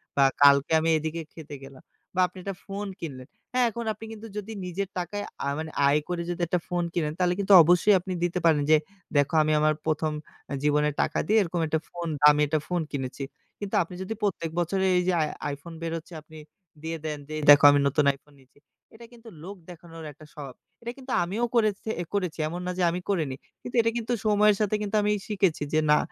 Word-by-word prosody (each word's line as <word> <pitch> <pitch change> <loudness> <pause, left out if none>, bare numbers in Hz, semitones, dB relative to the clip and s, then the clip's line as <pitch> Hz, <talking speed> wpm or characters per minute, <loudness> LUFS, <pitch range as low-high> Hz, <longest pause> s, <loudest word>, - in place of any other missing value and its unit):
বা 140 - +4 0.2
কালকে 140 +1 +6
আমি 160 +1 0
এদিকে 160 +2 -4
খেতে 150 -3 -9
গেলাম।" 135 -1 -14 0.3
বা 185 - +3
আপনি 180 +2 -17
একটা 195 0 -4
ফোন 200 +1 -5
কিনলেন। 130 -6 -7 0.3
হ্যাঁ 250 -1 +3
এখন 235 +1 -6
আপনি 215 +2 -11
কিন্তু 225 0 -9
যদি 210 +2 -5
নিজের 185 +2 -3
টাকায় 205 +4 -4 0.2
আ - - -1
মানে 160 0 -5 0.2
আয় 145 +2 +4
করে 175 -1 -2
যদি 175 0 -3
একটা 180 +1 0
ফোন 175 -1 -1
কিনেন 155 -3 -1
তাহলে 180 0 +2
কিন্তু 200 0 +3
অবশ্যই 180 +5 +4
আপনি 185 +1 -5
দিতে 175 +1 0
পারেন 155 -3 +4
যে, 155 - +8 0.4
"দেখো 145 +2 +2
আমি 155 - 0
আমার 155 0 +3
১ম 155 0 0 0.4
আ - - -2
জীবনের 150 0 +2
টাকা - - -1
দিয়ে 220 +2 +3
এরকম 175 -2 -2
একটা 160 +1 0
ফোন 170 -1 -6
দামি 150 0 +6
একটা 155 +1 0
ফোন 175 -2 -1
কিনেছি।" 135 0 -4 0.4
কিন্তু 205 -1 -4
আপনি 175 +2 -11
যদি 190 +4 -4
প্রত্যেক 180 -5 -1
বছরে 190 +3 0
এই - - +3
যে - - +4
আই - - +2 0.3
iPhone 155 +4 -10
বেরোচ্ছে 165 +1 -5
আপনি 155 +1 -15 0.5
দিয়ে 165 0 -3
দেন 155 -1 -3
যে, 155 - -8
"এই - - -5
দেখো 145 0 +7
আমি 145 - +3
নতুন 145 +1 +1
iPhone 145 +1 -24
নিচ্ছি।" 135 +2 -25 0.3
এটা 230 +1 -13
কিন্তু 230 -1 -14
লোক 195 +3 -7
দেখানোর 165 -1 -11
একটা 150 +2 -16
স্বভাব। 140 -4 -9 0.3
এটা 235 - -5
কিন্তু 260 -1 -9
আমিও 210 +7 -1
করেছ 215 -3 +3 0.3
এ - - -2
করেছি। 180 -6 -2
এমন 175 +3 -5
না 180 - -1
যে 185 - +1
আমি 180 - -3
করিনি। 155 -9 0 0.3
কিন্তু 245 - -8
এটা 230 - +1
কিন্তু 235 +1 -2
সময়ের 210 0 +4
সাথে 210 0 +1
কিন্তু 210 +1 -3
আমি 210 0 +1 0.2
শিখেছি 190 -7 0
যে, 155 - +4
"না 150 - +6
170 Hz, 220 wpm, -26 LUFS, 150-200 Hz, 0.5 s, যে